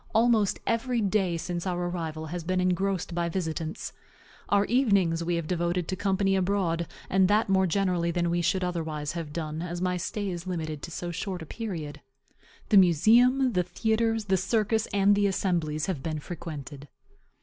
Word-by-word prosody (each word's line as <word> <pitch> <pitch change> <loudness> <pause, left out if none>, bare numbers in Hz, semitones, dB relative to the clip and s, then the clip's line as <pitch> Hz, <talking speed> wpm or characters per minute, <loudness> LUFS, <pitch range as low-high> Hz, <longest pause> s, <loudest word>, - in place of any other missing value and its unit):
Almost 225 -3 +3
every 235 +1 0
day 195 -4 +1
since 175 +2 -4
our 175 -1 -1
arrival 160 -3 -4
has 170 +2 -5
been 185 +2 0
engrossed 185 0 0
by 170 0 -1
visitants. 165 -2 -4 0.6
Our 200 0 +3
evenings 200 -10 +2
we 175 +1 0
have 170 -1 -2
devoted 175 0 -1
to 185 - -2
company 195 0 +1
abroad; 180 -3 0 0.2
and 190 0 +3
that 210 +1 +2
more 190 -1 +3
generally 180 -2 +1
than 170 0 0
we 175 0 +1
should 185 +2 +1
otherwise 160 -4 -3
have 165 -3 -5
done, 155 0 -4
as 175 0 -4
my 180 0 0
stay 195 +2 -3
is 175 0 -6
limited 155 -4 -3
to - - -7
so 175 +1 -5
short 180 0 -4
a - - -9
period. 160 -8 -6 0.7
The 205 - +6
museum, 235 - +5
the 180 - +3
theatres, 220 +5 0
the 190 -1 +2
circus, 215 +3 +1
and 200 0 +3
the 205 0 +3
assemblies 170 -6 0
have 185 -8 -3
been 155 +2 -3
frequented. 150 -3 -7
180 Hz, 175 wpm, -27 LUFS, 165-200 Hz, 0.7 s, The